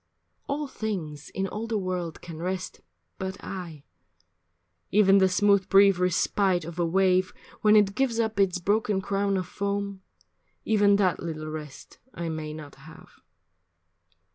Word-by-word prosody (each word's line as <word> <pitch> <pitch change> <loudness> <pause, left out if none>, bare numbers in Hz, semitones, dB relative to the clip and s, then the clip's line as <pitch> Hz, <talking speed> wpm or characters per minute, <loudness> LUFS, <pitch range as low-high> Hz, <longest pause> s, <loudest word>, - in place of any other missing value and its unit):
All 290 +2 -2
things 180 - -5
in 190 - -3
all 210 +4 -5
the 225 -2 -1
world 180 -4 -4
can 165 -2 -8
rest, 185 +1 -4 0.4
but 190 +1 -4
I, 170 -6 -7 1.1
Even 200 -1 +5
the 190 -1 +4
smooth 200 0 +3
brief 195 -1 +6
respite 180 0 +1
of 170 +1 -8
a 175 - +2
wave 185 +1 +2 0.3
When 215 -1 +5
it 205 -2 +4
gives 235 0 0
up 220 -2 -1
its 190 -2 +3
broken 205 +2 +1
crown 200 0 0
of 185 - -2
foam, 200 0 -3 0.6
Even 205 -2 +4
that 190 -3 +2
little 155 -2 -5
rest 150 -3 -9 0.2
I 170 -1 -4
may 155 -1 -4
not 150 -2 -9
have. 155 +4 -15
190 Hz, 145 wpm, -26 LUFS, 170-200 Hz, 1.1 s, brief